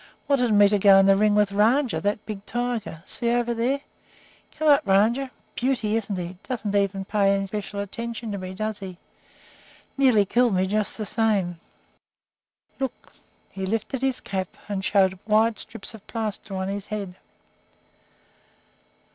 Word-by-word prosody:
Wanted 255 -5 +2
me 205 -1 +6
to 205 0 +2
go 195 0 +7
in 195 - +6
the 195 0 +6
ring 210 +1 +3
with 210 -1 +3
Rajah, 230 +6 +2
that 205 +1 -1
big 205 -2 -6
tiger. 240 -9 -3
See, 235 - 0
over 240 0 +1
there! 250 +5 0 0.8
Come 310 0 +2
up, 285 -1 +6
Rajah. 220 +8 +2 0.2
Beauty, 240 -4 0
isn't 215 -3 -2
he? 180 0 -5
Doesn't 220 -5 -4 0.4
pay 200 -1 +3
any 195 0 -1
special 200 0 -4
attention 230 +2 -5
to 200 - -4
me, 185 0 -7
does 215 +1 -3
he? 185 -2 -8 1.0
Nearly 245 -7 +5
killed 235 +1 +2
me, 185 +1 +2
just 210 +2 -1
the 215 - -3
same. 200 -6 0 1.2
Look!" 265 -1 -5 0.4
He 190 -1 -4
lifted 225 +5 -2
his 265 -1 0
cap 190 -2 -3 0.2
and 200 -2 -3
showed 190 -2 +2
wide 220 +1 +3
strips 225 +1 -7
of 220 -3 -13
plaster 215 -3 -4
on 190 0 -2
his 200 0 -4
head. 200 -3 -4
210 Hz, 155 wpm, -24 LUFS, 195-235 Hz, 1.2 s, go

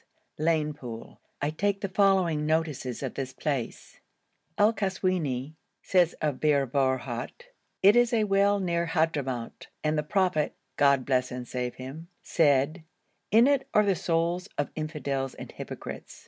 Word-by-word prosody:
Lane 155 -1 +1
Poole, 120 -5 -9 0.2
I 145 - +1
take 200 +4 -1
the 200 - -1
following 185 -6 +2
notices 155 -6 -1
of 130 - -3
this 130 -1 -5
place: 135 -4 -4 0.6
El 210 +2 +5
Kaswini 180 - -1 0.3
says 180 -3 +3
of 150 -4 -2
Bir 145 -3 +3
Borhut: 130 - -2 0.3
'It 200 +3 +7
is 240 0 +4
a 225 -2 +2
well 200 0 +3
near 170 -2 0
Hadhramout 145 -8 -2 0.2
and 155 0 +1
the - - +2
Prophet 180 -2 0 0.2
(God 140 -2 +3
bless 130 -1 +1
and 125 -1 -6
save 125 0 -3
him) 135 +6 -8 0.2
said 155 +1 +2 0.5
"In 225 +3 +6
it 275 -1 +2
are 210 0 +5
the 195 -2 +2
souls 170 +3 -1
of 145 - -1
infidels 145 -4 -3
and - - -9
hypocrites." - - -8
155 Hz, 145 wpm, -28 LUFS, 135-190 Hz, 0.6 s, It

